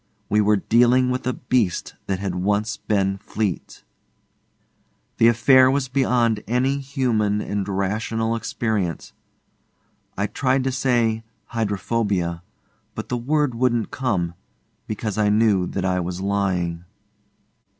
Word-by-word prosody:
We 105 Hz, +1 st, +3 dB
were 105 Hz, 0 st, +4 dB
dealing 125 Hz, +5 st, +3 dB
with 125 Hz, 0 st, -3 dB
a 125 Hz, -, +1 dB
beast 120 Hz, -8 st, -1 dB
that 95 Hz, -, 0 dB
had 95 Hz, -1 st, -3 dB
once 100 Hz, +4 st, 0 dB
been 95 Hz, -2 st, 0 dB
Fleete. 105 Hz, -4 st, -4 dB, 1.3 s
The 115 Hz, -, +5 dB
affair 130 Hz, +3 st, +6 dB
was 135 Hz, -1 st, 0 dB
beyond 120 Hz, -5 st, +1 dB
any 130 Hz, +4 st, +1 dB
human 120 Hz, -7 st, 0 dB
and 100 Hz, -1 st, -3 dB
rational 110 Hz, +4 st, -1 dB
experience. 110 Hz, -6 st, -2 dB, 1.0 s
I 100 Hz, -, +1 dB
tried 130 Hz, +4 st, 0 dB
to 135 Hz, -, 0 dB
say 120 Hz, -4 st, +1 dB, 0.3 s
'Hydrophobia,' 100 Hz, -5 st, -1 dB, 0.5 s
but 110 Hz, -, -6 dB
the 125 Hz, -, -1 dB
word 145 Hz, +2 st, 0 dB
wouldn't 120 Hz, -2 st, 0 dB
come, 95 Hz, -10 st, -1 dB, 0.5 s
because 110 Hz, -1 st, -3 dB
I 105 Hz, -1 st, +3 dB
knew 105 Hz, -4 st, +3 dB
that 95 Hz, -1 st, -3 dB
I 90 Hz, -1 st, +1 dB
was 90 Hz, 0 st, -4 dB
lying. 95 Hz, -4 st, -1 dB
110 Hz, 125 wpm, -22 LUFS, 100-125 Hz, 1.3 s, affair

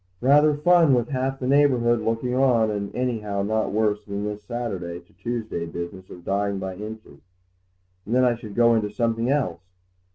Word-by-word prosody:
"Rather 145 Hz, +3 st, +5 dB
fun 165 Hz, -2 st, +4 dB
with 120 Hz, -1 st, 0 dB
half 135 Hz, 0 st, -1 dB
the 130 Hz, -, -5 dB
neighbourhood 125 Hz, -4 st, +3 dB
looking 115 Hz, +3 st, -1 dB
on, 125 Hz, -4 st, +3 dB
and 100 Hz, -1 st, -4 dB
anyhow 110 Hz, -6 st, -2 dB
not 110 Hz, +2 st, 0 dB
worse 105 Hz, 0 st, 0 dB
than 100 Hz, 0 st, -5 dB
this 105 Hz, 0 st, -4 dB
Saturday 100 Hz, -7 st, -4 dB
to 90 Hz, +4 st, -24 dB
Tuesday 115 Hz, -8 st, -4 dB
business 85 Hz, +3 st, -7 dB
of 85 Hz, -, -12 dB
dying 100 Hz, 0 st, 0 dB
by 95 Hz, -1 st, -5 dB
inches; 110 Hz, +2 st, -9 dB, 0.9 s
and 115 Hz, -, 0 dB
then 130 Hz, 0 st, +4 dB
I 125 Hz, -, +3 dB
should 110 Hz, -3 st, -9 dB
go 120 Hz, 0 st, +5 dB
on 115 Hz, -, +4 dB
into 105 Hz, -2 st, -1 dB
something 115 Hz, +2 st, -1 dB
else. 130 Hz, -, 0 dB
115 Hz, 185 wpm, -24 LUFS, 100-125 Hz, 0.9 s, Rather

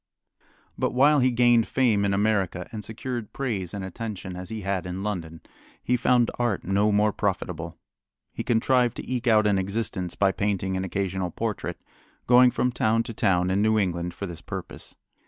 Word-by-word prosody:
But -, -, 0 dB
while 145 Hz, +3 st, +5 dB
he 130 Hz, 0 st, +4 dB
gained 120 Hz, -2 st, +4 dB
fame 115 Hz, -6 st, +2 dB
in 100 Hz, -, +1 dB
America 100 Hz, -3 st, 0 dB
and 110 Hz, -2 st, -6 dB
secured 115 Hz, +1 st, -5 dB
praise 105 Hz, -10 st, -3 dB
and 100 Hz, -2 st, -5 dB
attention 95 Hz, -1 st, -6 dB
as 90 Hz, 0 st, -7 dB
he 110 Hz, -1 st, -5 dB
had 95 Hz, -2 st, -2 dB
in 90 Hz, +2 st, -5 dB
London, 85 Hz, -6 st, -4 dB, 0.4 s
he 125 Hz, -, +2 dB
found 125 Hz, -1 st, +3 dB
art 120 Hz, -5 st, 0 dB
no 100 Hz, +3 st, +2 dB
more 105 Hz, 0 st, +2 dB
profitable. -, -, -3 dB, 0.6 s
He -, -, -4 dB
contrived 120 Hz, +1 st, +2 dB
to -, -, -7 dB
eke 125 Hz, -1 st, -2 dB
out 110 Hz, -2 st, +5 dB
an 100 Hz, -2 st, +3 dB
existence 95 Hz, -2 st, -3 dB
by 100 Hz, -1 st, +3 dB
painting 95 Hz, -2 st, -1 dB
an 95 Hz, -, -2 dB
occasional 95 Hz, -1 st, -2 dB
portrait, -, -, -4 dB, 0.5 s
going 125 Hz, +1 st, +7 dB
from 125 Hz, +1 st, 0 dB
town 115 Hz, -1 st, +1 dB
to 115 Hz, 0 st, -7 dB
town 90 Hz, -3 st, +1 dB
in 100 Hz, +2 st, +2 dB
New 110 Hz, +1 st, +3 dB
England 90 Hz, -3 st, -1 dB
for 100 Hz, -, -5 dB
this 85 Hz, -4 st, -8 dB
purpose. -, -, -8 dB
105 Hz, 180 wpm, -25 LUFS, 95-120 Hz, 0.6 s, going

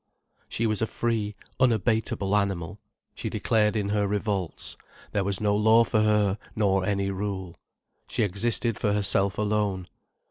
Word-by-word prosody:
She 115 Hz, -, -1 dB
was 110 Hz, -1 st, 0 dB
a 110 Hz, -, +1 dB
free, 110 Hz, -3 st, -2 dB, 0.2 s
unabateable 110 Hz, -4 st, +1 dB
animal, 100 Hz, -2 st, -1 dB, 0.3 s
she -, -, -4 dB
declared 110 Hz, -1 st, +1 dB
in 100 Hz, -2 st, -1 dB
her 105 Hz, -1 st, +1 dB
revolts: 100 Hz, -4 st, -2 dB, 0.4 s
there 100 Hz, -, 0 dB
was 95 Hz, -1 st, 0 dB
no 105 Hz, -1 st, +2 dB
law 110 Hz, +2 st, +5 dB
for 110 Hz, -1 st, +1 dB
her, 105 Hz, -2 st, +2 dB, 0.2 s
nor 95 Hz, -3 st, +2 dB
any 100 Hz, 0 st, 0 dB
rule. 95 Hz, -3 st, -4 dB, 0.5 s
She -, -, 0 dB
existed 110 Hz, +3 st, -1 dB
for 105 Hz, -2 st, +1 dB
herself 100 Hz, -1 st, +2 dB
alone. 105 Hz, -3 st, 0 dB
105 Hz, 145 wpm, -26 LUFS, 100-110 Hz, 0.5 s, law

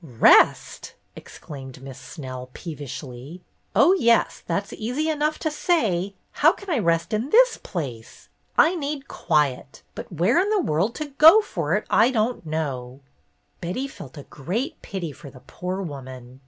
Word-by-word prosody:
"Rest!" 125 Hz, -8 st, +3 dB, 0.2 s
exclaimed 135 Hz, -3 st, -11 dB
Miss 135 Hz, -1 st, -9 dB
Snell, 130 Hz, -4 st, -8 dB
peevishly. 145 Hz, 0 st, -8 dB, 0.3 s
"Oh, 365 Hz, -, +6 dB
yes, 235 Hz, -, +2 dB
that's 200 Hz, 0 st, -2 dB
easy 260 Hz, +8 st, -2 dB
enough 305 Hz, 0 st, 0 dB
to 315 Hz, -, -2 dB
say. 205 Hz, -, 0 dB, 0.2 s
How -, -, +4 dB
can 400 Hz, -3 st, -8 dB
I 290 Hz, -, +2 dB
rest 170 Hz, +1 st, 0 dB
in 225 Hz, +6 st, -1 dB
this -, -, +5 dB
place? 125 Hz, -, -7 dB, 0.3 s
I 325 Hz, -, +6 dB
need 285 Hz, -3 st, -4 dB
quiet. 140 Hz, -2 st, -1 dB
But -, -, -9 dB
where 180 Hz, -, +2 dB
in 390 Hz, +3 st, +1 dB
the 425 Hz, -1 st, +2 dB
world 195 Hz, -, 0 dB
to 305 Hz, -, -4 dB
go 325 Hz, +8 st, +9 dB
for 170 Hz, -, -2 dB
it 210 Hz, -, -2 dB
I 225 Hz, +3 st, +4 dB
don't 230 Hz, -6 st, -1 dB
know." 135 Hz, -4 st, -4 dB, 0.6 s
Betty 185 Hz, +11 st, -3 dB
felt 145 Hz, -, -12 dB
a 145 Hz, -, -8 dB
great 225 Hz, -, -4 dB
pity 180 Hz, -5 st, -5 dB
for 140 Hz, +1 st, -12 dB
the 130 Hz, -2 st, -15 dB
poor 185 Hz, +6 st, -5 dB
woman. 130 Hz, -5 st, -9 dB
175 Hz, 155 wpm, -23 LUFS, -, 0.6 s, go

